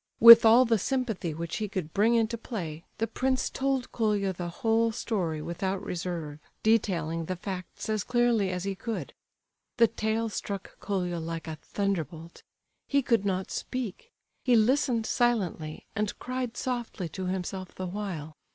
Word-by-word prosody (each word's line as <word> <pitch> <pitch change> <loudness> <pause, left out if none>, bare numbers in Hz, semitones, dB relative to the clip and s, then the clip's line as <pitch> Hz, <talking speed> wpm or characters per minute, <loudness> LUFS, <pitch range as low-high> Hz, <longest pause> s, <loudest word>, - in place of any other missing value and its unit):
With 230 0 +12
all 235 +3 +7
the 225 -2 +2
sympathy 225 - -1
which 165 0 -4
he 215 -1 -2
could 180 -5 -4
bring 220 +4 +4
into 230 0 +2
play, 175 -9 -6
the 225 - +1
prince 260 +2 -1
told 270 -1 -1
Colia 205 -4 +1
the 175 -1 -5
whole 225 +5 +1
story 175 -9 -2
without 190 +4 -3
reserve, 170 -4 -4 0.2
detailing 170 -7 +1
the 185 - -3
facts 185 0 -6
as 215 -3 0
clearly 240 -5 +2
as 180 -1 -3
he 195 0 -1
could. 225 +4 -5 0.6
The 235 - +7
tale 225 0 -1
struck 200 -2 -6
Colia 180 -4 -2
like 165 -1 -5
a 160 -1 -5
thunderbolt. 170 -4 -3 0.5
He 280 -1 +2
could 230 -5 +2
not 190 -1 -1
speak. 255 - -5 0.3
He 250 -2 +4
listened 235 0 +3
silently, 195 -12 0
and 210 -1 -1
cried 255 -1 -4
softly 240 -7 -3
to 185 +3 -5
himself 185 0 -4
the 185 - -4
while. 175 -6 -5
200 Hz, 155 wpm, -28 LUFS, 175-230 Hz, 0.6 s, With